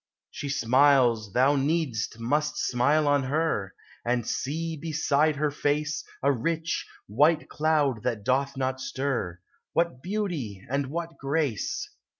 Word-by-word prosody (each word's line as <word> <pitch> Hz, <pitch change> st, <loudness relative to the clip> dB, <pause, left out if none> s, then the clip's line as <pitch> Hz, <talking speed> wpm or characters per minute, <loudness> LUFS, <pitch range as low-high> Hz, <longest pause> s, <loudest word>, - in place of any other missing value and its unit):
She 145 Hz, -, -5 dB
smiles; 130 Hz, -4 st, +4 dB
thou 130 Hz, +6 st, +4 dB
need'st 140 Hz, -6 st, -1 dB
must 150 Hz, +6 st, 0 dB
smile 145 Hz, +5 st, +2 dB
on 145 Hz, -1 st, +4 dB
her. 135 Hz, -9 st, -1 dB, 0.3 s
And 120 Hz, -1 st, 0 dB
see, 160 Hz, +4 st, -2 dB
beside 155 Hz, -1 st, +1 dB
her 150 Hz, +1 st, 0 dB
face, 150 Hz, +1 st, -1 dB, 0.2 s
A 140 Hz, -, +5 dB
rich, 160 Hz, +6 st, -1 dB, 0.2 s
white 150 Hz, +9 st, +3 dB
cloud 150 Hz, -6 st, +1 dB
that 115 Hz, -4 st, -2 dB
doth 135 Hz, +3 st, 0 dB
not 130 Hz, 0 st, -1 dB
stir: 130 Hz, -10 st, -2 dB, 0.3 s
What 170 Hz, -6 st, 0 dB
beauty, 170 Hz, -, -3 dB
and 140 Hz, +1 st, -1 dB
what 165 Hz, +3 st, -5 dB
grace! 150 Hz, -, -1 dB
140 Hz, 130 wpm, -27 LUFS, 125-155 Hz, 0.3 s, A